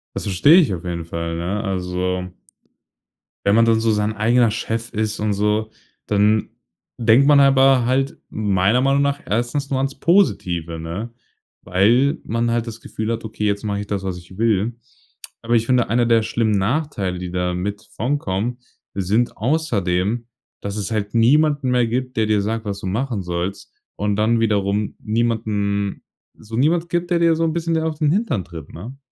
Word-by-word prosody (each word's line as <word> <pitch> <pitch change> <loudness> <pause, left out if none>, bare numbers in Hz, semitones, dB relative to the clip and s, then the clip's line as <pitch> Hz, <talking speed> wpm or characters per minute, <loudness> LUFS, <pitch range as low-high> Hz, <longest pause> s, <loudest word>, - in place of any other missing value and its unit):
Das - - -3
verstehe 105 - +5
ich 150 - +2
auf 85 - -5
jeden 85 -2 -4
Fall, 85 0 -4
ja, 95 +5 -2
also 90 -2 -2 1.2
wenn 100 - +4
man 115 0 +5
dann 115 -1 +3
so 115 0 +2
sein 105 0 0
eigener 115 +1 +3
Chef 115 +1 -3
ist 110 0 -2
und 105 -1 0
so, 105 +2 0 0.4
dann 105 +1 +2 0.5
denkt 115 +3 +4
man 145 -1 +6
aber 135 -2 +5
halt 135 +2 0
meiner 105 +2 +1
Meinung 135 +1 +2
nach 140 0 0
erstens 120 +6 -1
nur 135 - 0
ans 135 +1 -1
Positive, 85 - +1
ne? 90 +9 -6 0.5
Weil, 115 +10 +3
man 115 +1 0
halt 120 0 -1
das 115 0 -7
Gefühl 110 +1 -4
hat: 115 0 -3
„Okay, 110 -1 -4
jetzt 100 0 0
mache 100 -1 -2
ich 105 - -8
das, 100 -1 -3
was 95 -2 -3
ich 90 +2 -14
will”. 110 0 +1 0.7
Aber 115 +1 -2
ich 115 0 +2
finde, 125 -2 +2
einer 120 +2 +2
der 115 -1 +4
schlimmen 110 0 0
Nachteile, 100 - -1
die 90 -1 -5
damit 90 +3 -2
von 130 +6 0
kommen, 105 +3 -2 0.4
sind 100 +5 0
außerdem, 110 - 0 0.4
dass 100 0 -4
es 105 +2 -3
halt 105 -2 -2
niemanden 145 +4 +3
mehr 125 -2 +2
gibt, 125 +1 -3
der 110 - +3
dir 105 -1 +2
sagt, 110 +2 -3
was 100 -1 -4
du - - -4
machen 115 +2 -2
sollst 90 +2 -4 0.2
und 105 -1 -1
dann 115 +2 +2
wiederum 105 -1 0
niemanden 105 -3 -1 0.3
so 110 +1 -9
niemand 165 +6 +2
gibt, 175 0 -1
der 175 - +3
dir 165 -1 +4
so 165 - 0
'n 160 - 0
bisschen 165 0 -1
dir 160 0 0
auf 160 -1 -2
den 150 -2 +2
Hintern 165 - 0
tritt, 80 -4 -10
ne? 120 +11 -9
110 Hz, 185 wpm, -21 LUFS, 100-125 Hz, 1.2 s, man